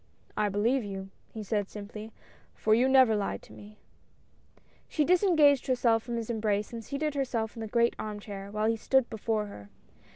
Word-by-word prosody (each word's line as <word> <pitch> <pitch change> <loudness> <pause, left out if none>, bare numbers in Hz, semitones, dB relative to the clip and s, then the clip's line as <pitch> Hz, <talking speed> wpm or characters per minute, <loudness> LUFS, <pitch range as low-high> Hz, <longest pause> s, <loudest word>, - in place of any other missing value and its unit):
"I 210 -1 +1
believe 225 +6 +1
you," 195 -1 -6 0.2
he 220 - -6
said, 205 -1 -1
simply, 210 +1 -8 0.4
"for 215 - +2
you 245 +4 +4
never 260 -4 +6
lied 205 -1 -2
to - - -15
me! 210 +1 -13 0.6
" - - -34
She 300 - +1
disengaged 325 -6 +4
herself 240 -3 +2
from 235 +1 -5
his 230 0 -3
embrace 215 -1 -1
and 230 -1 -6
seated 295 +4 -2
herself 245 -6 -2
in - - -8
the 220 - -4
great 235 +1 +2
arm 210 -1 -4
chair, 200 -1 -8
while 215 +1 -1
he 225 0 +2
stood 265 +2 +2
before 220 -1 -1
her. 105 - -11
220 Hz, 190 wpm, -29 LUFS, 210-255 Hz, 0.6 s, never